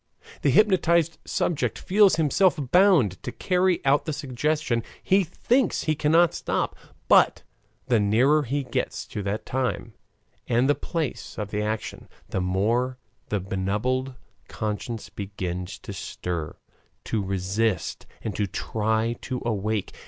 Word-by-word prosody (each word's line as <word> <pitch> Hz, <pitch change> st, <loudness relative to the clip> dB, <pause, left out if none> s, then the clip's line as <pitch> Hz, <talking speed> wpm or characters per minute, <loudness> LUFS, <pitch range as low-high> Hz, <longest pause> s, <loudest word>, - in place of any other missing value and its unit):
The -, -, +3 dB
hypnotized 170 Hz, -6 st, +3 dB
subject 155 Hz, -4 st, -1 dB
feels 200 Hz, -2 st, +4 dB
himself 165 Hz, +4 st, +3 dB
bound 175 Hz, -, +4 dB
to 125 Hz, -, -5 dB
carry 180 Hz, +5 st, +1 dB
out 140 Hz, +2 st, +3 dB
the 155 Hz, -, -2 dB
suggestion 145 Hz, -2 st, -1 dB, 0.2 s
he 195 Hz, +1 st, +4 dB
thinks 235 Hz, -, +1 dB
he 155 Hz, -, +1 dB
cannot 160 Hz, +3 st, +3 dB
stop -, -, -2 dB, 0.3 s
but -, -, +5 dB, 0.4 s
the 120 Hz, -3 st, +3 dB
nearer 120 Hz, +9 st, +4 dB
he 140 Hz, +1 st, -2 dB
gets 125 Hz, -, -3 dB
to 105 Hz, -, -4 dB
the 100 Hz, +1 st, -1 dB
time 125 Hz, -2 st, -3 dB, 0.5 s
and 120 Hz, +2 st, +3 dB
the 145 Hz, -, +5 dB
place 160 Hz, -1 st, -4 dB
of 105 Hz, -2 st, -4 dB
the 105 Hz, -, -1 dB
action, 110 Hz, +1 st, -4 dB, 0.2 s
the 95 Hz, -, -1 dB
more 115 Hz, +8 st, 0 dB, 0.3 s
the 105 Hz, -, 0 dB
benumbed 105 Hz, +8 st, -1 dB, 0.3 s
conscience 110 Hz, +1 st, -4 dB
begins 90 Hz, -3 st, -5 dB
to -, -, -8 dB
stir, 85 Hz, -4 st, -4 dB, 0.5 s
to 110 Hz, -, -1 dB
resist, 95 Hz, +2 st, -1 dB, 0.2 s
and 105 Hz, -3 st, -3 dB
to 105 Hz, -, 0 dB
try 110 Hz, +3 st, -1 dB
to 130 Hz, -2 st, -4 dB
awake. 110 Hz, -2 st, -1 dB
120 Hz, 135 wpm, -25 LUFS, 105-155 Hz, 0.5 s, but